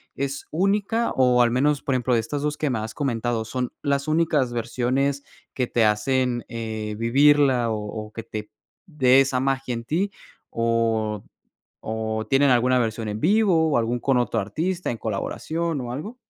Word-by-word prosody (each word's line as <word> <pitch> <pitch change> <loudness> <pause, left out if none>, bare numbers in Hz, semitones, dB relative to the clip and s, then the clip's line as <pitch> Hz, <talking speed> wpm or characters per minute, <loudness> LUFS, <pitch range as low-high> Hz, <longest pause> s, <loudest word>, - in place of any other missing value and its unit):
¿es 140 0 -4
única? 200 +6 +1
O 125 -1 +4
al 120 - +4
menos, 140 +4 +1
por 135 -3 -1
ejemplo, 125 0 0
de 115 - +3
estas 140 +6 -3
2 150 0 -2
que 150 - -1
me 120 -4 -1
has 110 +1 -5
comentado, 120 -4 -1
¿son 125 +2 -3
las 140 0 -1
únicas 155 -5 +2
versiones 130 +4 -1 0.3
que 125 - 0
te 115 -2 +2
hacen, 120 +3 +1
eh, 110 -2 -4
vivirla 135 0 +4
o 105 0 -4
o - - -18
que 115 - -7
te 110 -1 -7 0.3
dé 135 -7 +4
esa 130 -1 0
magia 135 -1 -1
en 115 0 -6
ti? 185 +9 -1 0.4
¿O 115 -2 0 0.6
o 110 0 -3
tienen 135 0 +4
alguna 125 +1 +3
versión 115 -2 -2
en 105 0 -3
vivo 175 - +3
o - - +3
algún 120 +1 0
con 130 +1 +1
otro 120 - 0
artista 165 - -2
en 115 - -6
colaboración 155 +10 -3
o 120 -1 -5
algo? 155 - -6
125 Hz, 175 wpm, -24 LUFS, 115-145 Hz, 0.6 s, O